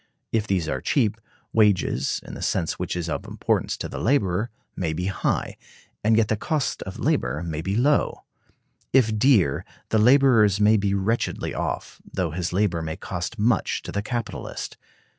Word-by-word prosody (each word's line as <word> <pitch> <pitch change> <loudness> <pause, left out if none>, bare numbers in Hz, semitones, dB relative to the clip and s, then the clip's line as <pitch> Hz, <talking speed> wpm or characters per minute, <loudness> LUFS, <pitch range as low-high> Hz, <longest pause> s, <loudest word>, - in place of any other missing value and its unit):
If 110 -1 0
these 90 -6 0
are 65 -3 -2
cheap, 110 -6 +1 0.3
wages, 100 - +2
in - - -9
the - - -7
sense - - -1
which - - -2
is 85 -1 -3
of 80 - -3
importance - - -1
to - - -4
the - - -6
laborer, 105 -4 +1 0.3
may 80 -4 -1
be 90 +3 -3
high, 100 - -1 0.5
and 110 +1 +4
yet 115 -2 +3
the 110 - +1
cost 150 +6 -1
of - - -6
labor 75 +4 0
may 80 -2 -3
be 95 +4 -2
low; 140 +6 +2 0.7
if 115 -5 +4
dear, 105 - +4 0.3
the 110 - +3
laborer 125 -2 +6
may 105 +1 +5
be 100 -1 +1
wretchedly 105 +5 -1
off, - - -4
though 90 -4 -3
his 85 +1 -2
labor 90 -3 +1
may 80 0 -4
cost 90 +6 -5
much 110 +1 +1
to - - -6
the 100 - -1
capitalist. 115 0 -4
105 Hz, 175 wpm, -24 LUFS, 90-115 Hz, 0.7 s, laborer